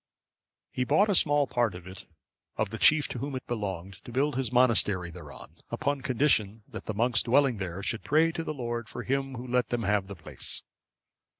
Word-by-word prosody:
(559) - - -3
He - - +4
bought 205 - +3
a - - +2
small 145 -3 +3
part 120 -7 0
of 90 -1 -10
it 95 +1 -10 0.5
of 110 -2 -1
the 115 - -5
chief 150 -2 +5
to 125 - -4
whom 140 +2 -4
it 130 - -6
belonged, 95 -5 -5
to - - -10
build 140 +3 0
his 130 -3 -1
monastery 105 -8 +4
thereon; 80 -4 -10
upon 140 -1 -1
condition, 115 -5 +1
that - - -8
the 110 - -4
monks 120 +3 +3
dwelling 130 -1 +3
there 95 0 -5
should 110 +2 -1
pray 160 +3 +3
to 165 0 -4
the - - -4
Lord 120 -5 -4
for - - -6
him 135 0 -2
who 125 +1 -7
let 125 -2 +1
them 120 -2 -1
have 100 -1 +1
the 100 - -7
place. 80 - -4
120 Hz, 210 wpm, -28 LUFS, 100-135 Hz, 0.5 s, chief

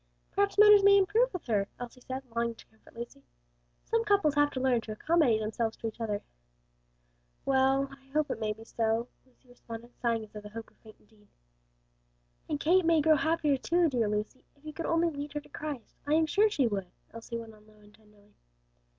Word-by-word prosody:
"Perhaps 400 0 0
matters 420 -1 +8
may 400 0 +7
improve 435 +6 +3
with 365 - -6
her," 205 -4 0
Elsie 245 +1 -8
said, 260 +2 -6
longing 235 0 0
to - - -16
comfort 220 +1 -23
Lucy. 235 -12 -8 0.6
"Some 455 0 +1
couples 400 -9 +3
have 290 0 +3
to 260 - -3
learn 255 -2 +2
to 220 - -8
accommodate 280 -2 +2
themselves 220 +1 -2
to - - -9
each 225 +1 -8
other." 210 -2 -2 1.2
"Well, 270 0 +3
I 275 0 -16
hope 300 +2 0
it - - -4
may 215 -1 -1
be 220 +1 -8
so," 225 +1 -1 0.2
Lucy 255 0 -30
responded, 235 -1 -10
sighing 230 -2 0
as 215 - -13
though 210 - -8
the 210 - -10
hope 225 +1 -9
were - - -31
faint 220 -1 -15
indeed. 210 -1 -26 1.2
"And 295 - -1
Kate 360 +5 +4
may 330 -1 +4
grow 310 +1 +5
happier, 305 -2 +1
too; 340 +4 +2
dear 235 -6 0
Lucy, 210 +5 -3
if 285 +1 -26
you 305 - -7
could 330 - -4
only 335 0 +2
lead 285 0 -6
her 295 - -2
to 290 - -18
Christ, 295 -7 -7
I 300 - +3
am 320 0 +4
sure 410 +8 +3
she 285 -11 +1
would," 200 -5 -2 0.3
Elsie 230 +1 -6
went 225 -1 -9
on 210 0 -20
low 215 - -21
and 210 0 -20
tenderly. 210 -1 -24
255 Hz, 210 wpm, -30 LUFS, 220-315 Hz, 1.2 s, matters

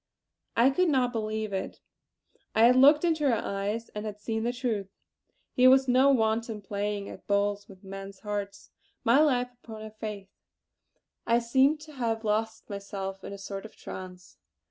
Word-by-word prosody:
I 245 +4 +6
could 360 +5 +2
not 255 -4 +2
believe 215 -2 -3
it. 190 - -4 0.8
I 220 - +5
had 250 +1 +6
looked 290 +5 +6
into 315 -4 +2
her 235 - +3
eyes, 205 +2 -3
and 210 - -6
had 210 -1 -6
seen 220 +1 -2
the 235 +2 0
truth. 235 -6 -2 0.6
Here 255 +1 +6
was 265 0 +5
no 255 +2 +5
wanton 225 -3 +1
playing 205 0 -3
at - - -11
bowls 205 0 0
with 190 -1 -15
men's 195 0 -9
hearts. 205 -1 -5 0.3
My 235 +5 +5
life 250 -5 +2
upon 220 -2 -9
her 220 - -8
faith! 210 -3 -7 1.0
I 235 0 +4
seemed 265 +6 +3
to 305 0 -12
have 230 -4 -2
lost 220 +1 -1
myself 195 -1 -6
in - - -7
a 200 - -6
sort 195 0 -6
of 220 - -12
trance. 185 -1 -10
220 Hz, 170 wpm, -28 LUFS, 200-250 Hz, 1.0 s, I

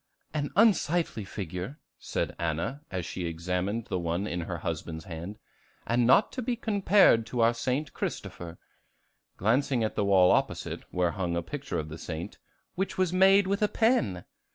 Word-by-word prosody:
"An 145 -2 -1
unsightly 175 - +3
figure," 95 - -6 0.2
said - - -3
Anna, 85 - -2
as 90 -3 -3
she 90 0 -4
examined 90 +6 -2
the 95 - -2
one 85 +3 -1
in 90 -4 -3
her 85 +1 -4
husband's 80 0 -4
hand, 85 +5 -7 0.5
"and 120 0 +2
not 130 +11 +5
to 255 - -4
be 245 0 -1
compared 200 - +4
to 120 0 -1
our 115 +1 +5
St. 130 +4 -2
Christopher," 85 -1 -5 0.8
glancing 120 +3 +2
at 110 - -1
the - - 0
wall 95 -2 +5
opposite, - - -1
where 90 -1 +1
hung 90 -3 -2
a 85 - -1
picture 80 - -5
of 80 0 -3
the 80 +1 -8
saint, 80 +1 -6 0.3
"which 190 +1 -3
was 185 -2 +1
made 195 +2 +6
with 200 +2 -1
a 210 - +4
pen!" 175 - +1
105 Hz, 170 wpm, -28 LUFS, -, 0.8 s, made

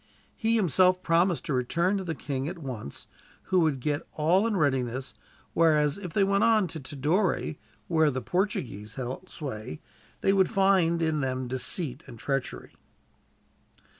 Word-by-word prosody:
He 225 0 +1
himself 185 -2 +3
promised 170 +1 +2
to 150 - -1
return 170 +10 +1
to 195 - -3
the 165 -3 -3
king 135 -1 -3
at 180 - -7
once, 125 - -7 0.4
who 185 -1 +2
would 155 -5 +2
get 145 +3 -1
all 175 +8 +3
in 215 -3 0
readiness; 130 -4 0 0.4
whereas, 150 -1 +3
if 180 -4 -6
they 200 - +2
went 200 +1 +2
on 220 -4 +4
to 160 - -6
Tidore, 145 - 0 0.3
where 160 -2 +3
the 130 -2 -2
Portuguese 120 - -2
held 130 +8 -5
sway, 110 - -6 0.4
they 195 - +3
would 190 -1 +3
find 190 -5 +3
in 155 -2 +1
them 130 -1 -2
deceit 130 +3 -2
and 115 - -10
treachery. 135 +3 -3
160 Hz, 155 wpm, -27 LUFS, 130-185 Hz, 0.4 s, on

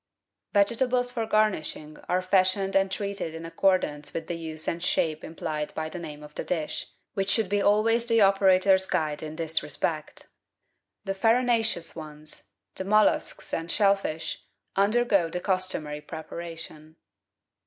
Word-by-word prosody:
Vegetables 245 +4 +2
for 230 -3 -2
garnishing 190 -8 0
are 180 +1 +1
fashioned 190 +1 +2
and 195 0 +4
treated 200 -4 -3
in 165 0 -7
ac 165 - -9
cordance 185 -6 +1
with 165 - -3
the - - -4
use 160 -2 -4
and 170 - -1
shape 155 -3 0
implied 155 -2 -4
by 155 0 -3
the 175 - -6
name 150 -3 -8
of 150 0 -12
the - - -4
dish, 160 -1 -2 0.3
which 195 -1 -1
should 205 0 +1
always 220 +3 +4
be 230 - +3
the 225 - +5
operator's 190 -1 +5
guide 155 -4 -1
in 155 0 -6
this 165 -1 0
respect. - - -3 0.8
The 195 - -1
farinaceous 225 -4 +2
ones, 155 -1 -7 0.2
the - - -4
molluscs 215 +2 +2
and 165 +1 -2
shell 200 +2 +4
fish, 160 -5 -4 0.3
undergo 200 -3 +3
the 180 - -3
customary 185 -6 -1
preparation. 160 -1 -8
185 Hz, 150 wpm, -27 LUFS, 160-200 Hz, 0.8 s, the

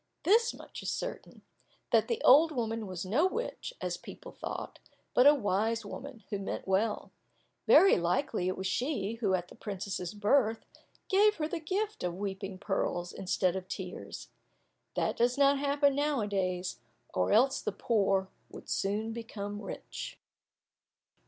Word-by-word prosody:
This 455 +6 +4
much - - -10
is - - -3
certain, - - -5 0.5
that - - +4
the 465 - -2
old 310 +5 +7
woman 225 -5 -2
was 185 -1 -5
no 260 - +3
witch, 475 +5 -4
as - - -2
people - - -11
thought, - - -6 0.3
but 250 +3 +6
a 295 - +8
wise 220 -1 0
woman, 260 -5 -8
who 200 - -1
meant 195 - -4
well. 205 +3 0 0.6
Very 390 - +7
likely 180 +3 0
it 185 - -1
was 190 - -4
she 230 0 -1
who, 195 -4 +3
at 175 -1 -4
the - - -12
princess's 195 -2 -5
birth, 220 +2 +2 0.4
gave 420 +2 +4
her 305 -2 -2
the 340 +1 -3
gift 405 +7 -2
of 175 0 -2
weeping 195 -1 -4
pearls 180 -2 -2
instead 185 -1 0
of 190 -1 -5
tears. 185 -1 -7 0.7
That - - 0
does 245 +2 +2
not 280 0 +5
happen 285 0 +3
now 290 -2 +1
a 205 - -1
days, 185 -2 -2 0.3
or 90 -1 +1
else 260 +5 +4
the - - -2
poor 195 -4 +1 0.2
would - - -11
soon 210 +3 -1
become 205 -3 -6
rich. - - -7
215 Hz, 160 wpm, -31 LUFS, 190-280 Hz, 0.7 s, a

